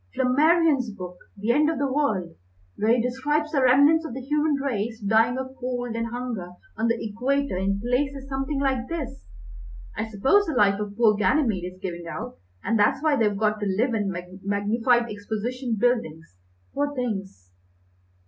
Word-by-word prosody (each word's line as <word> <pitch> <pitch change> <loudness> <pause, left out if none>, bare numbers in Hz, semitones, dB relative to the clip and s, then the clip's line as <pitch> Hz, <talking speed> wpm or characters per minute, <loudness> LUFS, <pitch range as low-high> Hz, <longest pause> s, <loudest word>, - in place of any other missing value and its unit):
Flammarion's 290 0 +3
book, 180 -3 -8 0.2
'The 210 +4 0
End 300 +5 +3
of 325 - -1
the 285 - 0
World,' 205 - 0 0.4
where 225 +3 +3
he - - +1
describes 290 +6 -1
the 280 - +1
remnants 285 +6 +5
of 285 -7 -6
the - - -4
human 295 +3 +1
race 230 -5 -2
dying 220 +4 +2
of 260 0 -5
cold 245 -2 -3
and 230 0 -1
hunger 230 -7 -5 0.2
on 225 +1 0
the 230 0 +1
Equator 250 +3 -1
in 195 +2 0
places 270 +4 -1
something 270 +1 -2
like 265 -3 0
this. 275 - -5 0.7
I 220 +1 -3
suppose 265 - +3
the 320 - -1
life 200 -4 +3
of 205 -1 -5
poor 225 -3 +5
Ganymede 210 - +1
is 185 - -18
giving 175 -3 -6
out, 165 - -6 0.2
and 225 -1 +1
that's 265 +7 +2
why 310 -2 +3
they've 210 -5 +1
got 215 0 +1
to 205 - -2
live 225 +6 +1
in 205 -3 0 0.3
magnified 225 +5 +1
exposition 225 +4 -3
buildings, 165 - -1 0.4
poor 285 0 -1
things!" 195 - -4
240 Hz, 170 wpm, -25 LUFS, 205-270 Hz, 0.7 s, remnants